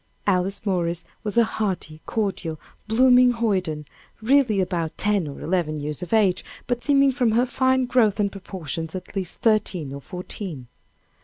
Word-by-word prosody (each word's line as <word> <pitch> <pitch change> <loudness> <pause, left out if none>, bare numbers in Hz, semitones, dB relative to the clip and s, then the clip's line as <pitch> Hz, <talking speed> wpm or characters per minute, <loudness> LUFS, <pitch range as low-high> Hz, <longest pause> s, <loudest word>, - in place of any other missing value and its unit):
Alice 195 +1 0
Morris 170 -3 -1 0.2
was 215 +1 -3
a 235 - +7
hearty, 190 -8 -3
cordial, 190 -7 -2 0.3
blooming 250 +2 +5
hoyden, 185 -10 -1 0.3
really 240 -2 +3
about 170 -4 -2
ten 205 -5 +2
or 140 - -8
eleven 165 -3 -1
years 150 0 -4
of 180 - -6
age, 210 -5 +3 0.2
but 245 -1 -2
seeming 275 -1 +4
from 245 -4 +1
her 240 +3 +3
fine 260 0 +2
growth 235 -5 +2
and 200 -1 +1
proportions, 165 -4 -6
at 185 +2 -8
least 190 -3 -4
thirteen 190 - +1
or 140 - -7
fourteen. 180 - -6
195 Hz, 155 wpm, -24 LUFS, 170-230 Hz, 0.3 s, a